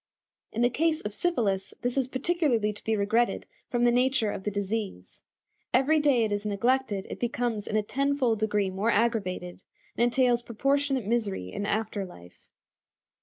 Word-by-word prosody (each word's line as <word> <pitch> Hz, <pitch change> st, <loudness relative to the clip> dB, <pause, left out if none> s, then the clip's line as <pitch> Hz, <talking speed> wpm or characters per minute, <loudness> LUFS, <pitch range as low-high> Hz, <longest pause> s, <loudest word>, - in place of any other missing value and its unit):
In 230 Hz, -, 0 dB
the 245 Hz, -, +3 dB
case 315 Hz, +4 st, +1 dB
of 210 Hz, -, -5 dB
syphilis 210 Hz, -, 0 dB
this 245 Hz, 0 st, 0 dB
is 265 Hz, -2 st, +1 dB
particularly 260 Hz, -6 st, +1 dB
to 210 Hz, -, -13 dB
be 220 Hz, -, +1 dB
regretted 225 Hz, +4 st, +1 dB, 0.2 s
from 240 Hz, -1 st, 0 dB
the 240 Hz, -, +5 dB
nature 250 Hz, -3 st, +2 dB
of 190 Hz, -, -6 dB
the -, -, +1 dB
disease. 200 Hz, -, -4 dB, 0.5 s
Every 285 Hz, +5 st, +4 dB
day 280 Hz, -6 st, +3 dB
it 215 Hz, -, -1 dB
is 205 Hz, 0 st, -1 dB
neglected 210 Hz, 0 st, 0 dB
it -, -, -6 dB
becomes 235 Hz, -3 st, -2 dB
in 215 Hz, -, -2 dB
a 215 Hz, -, +2 dB
tenfold 270 Hz, -2 st, 0 dB
degree 210 Hz, -3 st, +1 dB
more 195 Hz, +4 st, 0 dB
aggravated, 200 Hz, -6 st, 0 dB, 0.3 s
and -, -, +2 dB
entails 245 Hz, -1 st, +3 dB
proportionate 275 Hz, +2 st, 0 dB
misery 200 Hz, -, -1 dB
in 205 Hz, -, -3 dB
after 215 Hz, -1 st, -1 dB
life. 90 Hz, -, -13 dB
230 Hz, 170 wpm, -28 LUFS, 205-255 Hz, 0.5 s, the